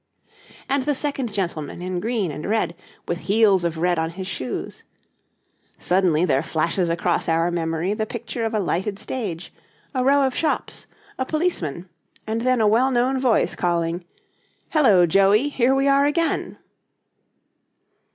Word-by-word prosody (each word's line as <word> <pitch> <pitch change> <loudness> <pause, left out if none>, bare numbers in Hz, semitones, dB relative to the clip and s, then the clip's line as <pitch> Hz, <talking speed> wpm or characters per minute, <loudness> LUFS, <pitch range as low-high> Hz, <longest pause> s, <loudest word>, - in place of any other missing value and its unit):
And 275 -1 0
the 290 - +1
second 275 -4 -2
gentleman 170 -8 -3
in 180 0 -3
green 215 -4 -1
and 150 +6 -6
red, 195 -6 0 0.3
with 175 - -2
heels 200 -3 +4
of 170 -1 -1
red 175 +1 +1
on 160 0 -1
his 185 +3 -7
shoes? 130 -10 -5 0.9
Suddenly 180 -3 +2
there 135 -6 +2
flashes 165 +3 -1
across 170 +1 0
our 165 +1 +2
memory 165 +2 -1
the 215 0 -2
picture 235 0 -5
of 225 0 -1
a - - +2
lighted 195 +2 -1
stage, 195 -9 -5 0.4
a 255 -2 0
row 280 +2 +4
of 260 - -1
shops, 320 - -1 0.3
a 260 - 0
policeman, 190 - -1 0.4
and 220 +1 -2
then 255 -1 +2
a 215 - +4
well 235 +5 +3
known 260 +1 +1
voice 255 -3 +2
calling, 170 0 -1 0.7
'Hello, 215 - +5
Joey, 195 - +3
here 265 -1 +2
we 270 +1 +2
are 280 +1 +4
again!' 330 +3 -1
200 Hz, 150 wpm, -22 LUFS, 170-255 Hz, 0.9 s, Hello